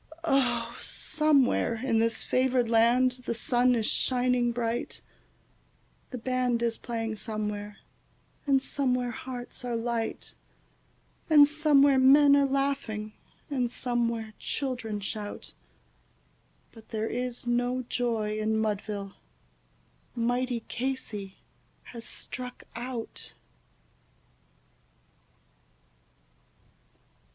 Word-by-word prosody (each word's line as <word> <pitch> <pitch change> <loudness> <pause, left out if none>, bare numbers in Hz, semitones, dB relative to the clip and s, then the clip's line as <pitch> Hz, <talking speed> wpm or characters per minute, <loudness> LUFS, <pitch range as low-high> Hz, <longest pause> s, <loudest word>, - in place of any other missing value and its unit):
Oh, 270 -6 +1
somewhere 300 -6 +2
in 230 -1 0
this 225 0 +1
favoured 255 -1 +2
land 235 +3 +4 0.2
the 235 - 0
sun 245 +2 +3
is 225 -2 0
shining 250 -1 +1
bright, 235 0 -3 1.1
The 255 - -5
band 250 -1 0
is 230 -1 +1
playing 225 -2 -4
somewhere, 210 -1 -4 0.7
and 270 -1 +3
somewhere 250 -3 0
hearts 245 +1 -7
are 245 -1 -2
light, 230 -1 -3 0.9
And 295 -2 +8
somewhere 285 -3 +4
men 280 +2 +7
are 280 -1 +4
laughing, 270 -6 -1 0.3
and 255 -4 -1
somewhere 235 -3 -1
children 245 -7 -3
shout; 205 +1 -5 1.2
But 225 -1 -16
there 220 0 -2
is 250 0 -3
no 245 +1 0
joy 225 -3 -1
in 220 0 0
Mudville 205 -2 -2 1.0
mighty 245 0 0
Casey 225 -7 -4 0.5
has 230 -2 -8
struck 250 0 -6
out. 240 -1 -6
245 Hz, 90 wpm, -28 LUFS, 225-255 Hz, 1.2 s, And